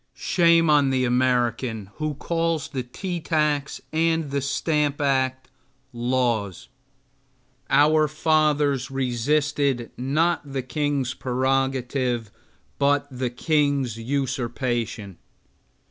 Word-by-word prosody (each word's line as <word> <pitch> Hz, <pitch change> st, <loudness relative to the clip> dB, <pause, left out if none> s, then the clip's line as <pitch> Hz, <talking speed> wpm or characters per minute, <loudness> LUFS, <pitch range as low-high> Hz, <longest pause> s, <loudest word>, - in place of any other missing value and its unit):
Shame 170 Hz, -2 st, +3 dB
on 145 Hz, -2 st, +4 dB
the 130 Hz, -1 st, +1 dB
American 120 Hz, -4 st, 0 dB
who 155 Hz, -1 st, -2 dB
calls 165 Hz, 0 st, -1 dB
the 130 Hz, -, -3 dB
tea 175 Hz, +9 st, -5 dB
tax 150 Hz, -3 st, 0 dB
and 160 Hz, -4 st, 0 dB
stamp 150 Hz, 0 st, 0 dB
act 130 Hz, -2 st, 0 dB, 0.5 s
laws! 120 Hz, -6 st, -1 dB, 1.0 s
Our 155 Hz, +1 st, +4 dB
fathers 150 Hz, -3 st, +1 dB
resisted, 135 Hz, 0 st, 0 dB
not 155 Hz, +7 st, +1 dB
the 135 Hz, -2 st, -2 dB
king's 140 Hz, -2 st, -1 dB
prerogative, 130 Hz, -2 st, -1 dB, 0.5 s
but 140 Hz, 0 st, +2 dB
the 125 Hz, -1 st, -2 dB
king's 140 Hz, -3 st, 0 dB
usurpation. 120 Hz, -5 st, -2 dB
135 Hz, 90 wpm, -24 LUFS, 125-150 Hz, 1.0 s, on